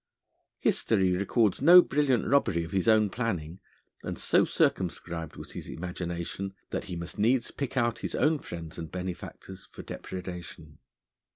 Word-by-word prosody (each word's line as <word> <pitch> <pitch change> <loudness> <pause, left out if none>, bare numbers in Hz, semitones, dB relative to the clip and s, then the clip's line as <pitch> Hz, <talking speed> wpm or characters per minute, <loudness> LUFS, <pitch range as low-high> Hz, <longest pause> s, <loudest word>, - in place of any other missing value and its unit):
History 95 -5 +2
records 100 +2 +1
no 175 +5 +9
brilliant 135 -5 +1
robbery 100 -12 +2
of 85 - -8
his 95 +1 0
own 110 -2 +4
planning, 95 -8 -3 0.4
and - - -5
so - - +3
circumscribed 85 -3 -1
was - - -9
his - - -7
imagination 90 +2 -5 0.2
that - - -3
he 90 - -5
must 85 +4 -6
needs 120 +4 +2
pick 140 -2 -4
out 120 -2 +1
his - - -3
own 150 +4 +2
friends 85 - -8
and 80 -1 -6
benefactors 95 +1 -7
for - - -10
depredation. 90 -2 -8
95 Hz, 150 wpm, -28 LUFS, 85-120 Hz, 0.4 s, no